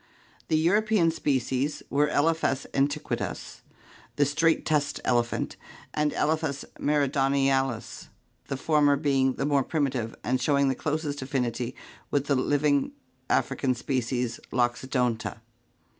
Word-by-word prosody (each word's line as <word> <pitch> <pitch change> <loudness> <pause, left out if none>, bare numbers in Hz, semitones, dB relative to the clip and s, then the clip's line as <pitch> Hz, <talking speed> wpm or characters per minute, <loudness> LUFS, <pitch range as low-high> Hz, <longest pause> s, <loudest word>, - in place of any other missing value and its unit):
The 155 - +2
European 195 +1 +3
species 135 -2 -1
were 145 +1 +3
Elephas 150 -2 +1
antiquus, 140 +1 -2 0.5
the 145 - +3
straight 160 +3 +2
tusked 150 -2 0
elephant, 120 -1 0 0.4
and 150 0 +1
Elephas 155 -2 -1
meridionalts, 135 -4 +1 0.4
the 135 - -3
former 145 0 +3
being 135 -2 +2
the 135 - -2
more 140 -1 +3
primitive 130 -7 -1
and 130 +1 0
showing 140 0 +3
the - - +2
closest 150 0 -3
affinity 125 -2 -2 0.3
with 140 -1 0
the 145 - +1
living 145 - +1 0.4
African 135 -1 +1
species 125 -2 -2
Loxodonta. 120 -2 0
140 Hz, 115 wpm, -27 LUFS, 130-150 Hz, 0.5 s, European